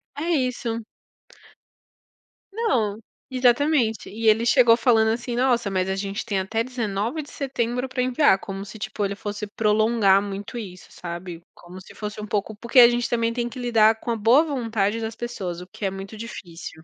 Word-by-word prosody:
É 290 - -4
isso. 250 -5 -1 1.7
Não, 235 - 0 0.3
exatamente, 255 -1 +2
e 225 +2 -2
ele 220 +2 +3
chegou 240 -1 +5
falando 225 -4 +3
assim: 235 +2 -2
"Nossa, 240 -4 +2
mas 185 0 0
a 190 - 0
gente 195 +2 -4
tem 200 -3 -1
até 220 +4 -1
19/09 250 +2 -3
pra 260 -1 -2
enviar", 255 -4 +4
como 195 0 -6
se 205 +2 -10
tipo 205 0 -4
ele 200 0 -1
fosse 205 +1 -5
prolongar 210 -1 +3
muito 200 +3 -6
isso, 185 -5 -8
sabe 170 0 -7
como 180 +2 -12
se - - -15
fosse 210 0 -6
um 210 - -6
pouco 210 +1 -2
porque 235 +4 +2
a 240 - +11
gente 240 0 -1
também 230 -1 0
tem 240 0 -2
que 250 - -11
lidar 225 -2 +3
com 235 - -3
a - - 0
boa 230 +7 +5
vontade 230 -7 -1
das 220 0 -4
pessoas, 190 -8 -5
o 180 - -10
que 200 - -12
é 195 - +2
muito 195 +2 -8
difícil. 175 -7 -9
225 Hz, 180 wpm, -24 LUFS, 200-240 Hz, 1.7 s, a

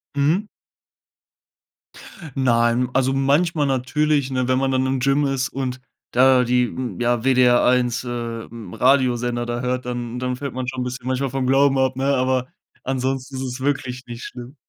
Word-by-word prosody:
Mhm. 155 +9 +1 1.9
Nein, 120 -1 +2
also, 135 0 +2
manchmal 145 +3 +2
natürlich, 140 +2 0
ne, 130 -1 0
wenn 130 0 +2
man 135 0 +1
dann 130 0 +1
im 130 0 0
Gym 140 +3 +2
ist 135 -1 -1
und 130 -1 -4 0.3
da 130 0 +5
die 125 +1 +2
n 125 0 -5
ja, 120 -1 +1
WDR 125 -2 +4
1, 125 -1 +2
äh, 120 -2 -5
hm, 110 -6 -10
Radiosender 125 -2 +2
da 120 0 -3
hört, 125 0 -2
dann 120 0 -4
dann 125 0 -2
fällt 140 +1 -5
man 130 -1 -4
schon 130 -1 -3
bisschen 125 0 -6
manchmal 130 +1 -1
vom 135 0 -1
Glauben 135 +1 +4
ab, 130 -1 +1
ne? 135 +1 -2
Aber 130 0 0 0.4
ansonsten 130 0 -2
ist 130 - -4
es 130 -1 -5
wirklich 130 -2 -2
nicht 120 0 -8
schlimm. 125 +3 -9
130 Hz, 170 wpm, -21 LUFS, 125-135 Hz, 1.9 s, da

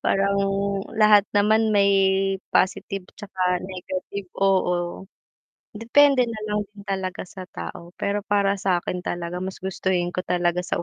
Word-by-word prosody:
Parang 200 0 +1 0.6
lahat 210 -2 +6
naman 215 +2 +4
may 200 0 +5 0.6
positive, 190 0 0
'tsaka 185 -3 -2
negative 185 +1 -6
oo. 180 -2 +1 0.7
Depende 250 +3 +4
nalang 210 -2 -3
din 200 - -10
talaga 190 -2 -3
sa 185 0 -10
tao 130 - -8
pero 200 +1 -1
para 200 -1 +2
sakin 180 -1 -1
talaga 175 0 -3
mas 190 +1 -5
gustuhin 185 -2 -1
ko 175 - -7
talaga 175 0 +1
sa - - -2
190 Hz, 130 wpm, -24 LUFS, 180-205 Hz, 0.7 s, lahat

